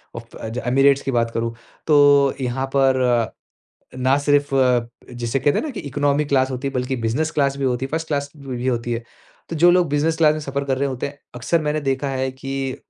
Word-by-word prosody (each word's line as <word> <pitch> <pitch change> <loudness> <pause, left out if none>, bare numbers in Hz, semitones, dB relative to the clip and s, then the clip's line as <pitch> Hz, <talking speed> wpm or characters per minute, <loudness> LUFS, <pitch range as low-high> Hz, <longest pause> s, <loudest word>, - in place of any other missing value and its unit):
उफ़, 115 0 -10
अ 110 - -6 0.2
"एमिरेट्स" 135 +2 +4
की 135 - -2
बात 115 -2 +1
करूँ, 115 0 -2 0.3
तो 145 -2 +5
यहाँ 130 +1 -1
पर, 130 -4 +2 0.6
ना 130 +1 +2
सिर्फ़ 145 0 +2 0.7
जिसे 120 +2 -2
कहते 145 - +2
हैं - - -2
न - - -4
कि 235 - -6
इकोनॉमी 145 +1 0
क्लास 135 -2 +1
होती 130 +2 -3
है, 135 - -8
बल्कि 125 +1 -1
बिज़नेस 150 +8 0
क्लास 140 -1 +2
भी 140 - -2
होती 125 0 0
है, - - -17
फ़र्स्ट 160 +1 -2
क्लास 140 -1 -2
भी 130 -3 -5
होती 120 -1 -1
है। 115 0 -3 0.5
तो 165 - -3
जो 175 +3 +6
लोग 175 -1 +3
बिज़नेस 150 +3 +1
क्लास 155 -2 +4
में 155 - -4
सफ़र 140 -1 -3
कर 135 -1 -1
रहे 140 +1 0
होते 130 -2 -3
हैं, 140 0 -14 0.2
अकसर 125 +7 0
मैंने 150 0 -1
देखा 135 0 -1
है 130 0 -1
कि 135 0 -4
135 Hz, 220 wpm, -21 LUFS, 125-145 Hz, 0.7 s, जो